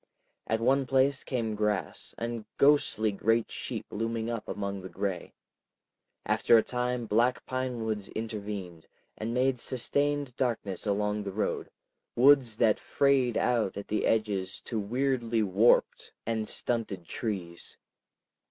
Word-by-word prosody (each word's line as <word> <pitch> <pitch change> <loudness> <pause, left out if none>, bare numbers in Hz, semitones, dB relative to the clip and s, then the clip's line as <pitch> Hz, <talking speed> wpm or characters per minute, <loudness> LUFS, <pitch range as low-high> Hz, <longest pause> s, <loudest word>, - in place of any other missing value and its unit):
At 110 - +1
one 135 +3 +2
place 135 +1 +2
came 115 -4 -2
grass, 105 -2 -2
and 115 -1 -4
ghostly 140 -7 +3
great 115 +3 +1
sheep - - -5
looming 115 +1 -2
up 115 -2 -5
among 100 -1 -4
the 95 - -8
gray. 95 -1 -3 0.9
After 115 - +4
a 110 - +4
time 125 -1 -2
black 115 +4 +1
pinewoods 115 -5 -3
intervened, 105 -6 -6 0.3
and 110 +2 -4
made 125 +1 +1
sustained 140 +2 0
darknesses 110 -6 -2
along 105 +1 0
the 100 -1 -5
road, 105 +3 -2 0.5
woods 125 -3 +5
that 110 -3 +3
frayed 135 -4 +2
out 115 -6 +1
at 100 - -7
the 105 - 0
edges 100 -4 0
to 115 - -3
weirdly 120 0 0
warped 105 +4 +2
and 110 -1 -2
stunted 110 -7 -2
trees. 90 -5 -5
115 Hz, 130 wpm, -29 LUFS, 105-125 Hz, 0.9 s, woods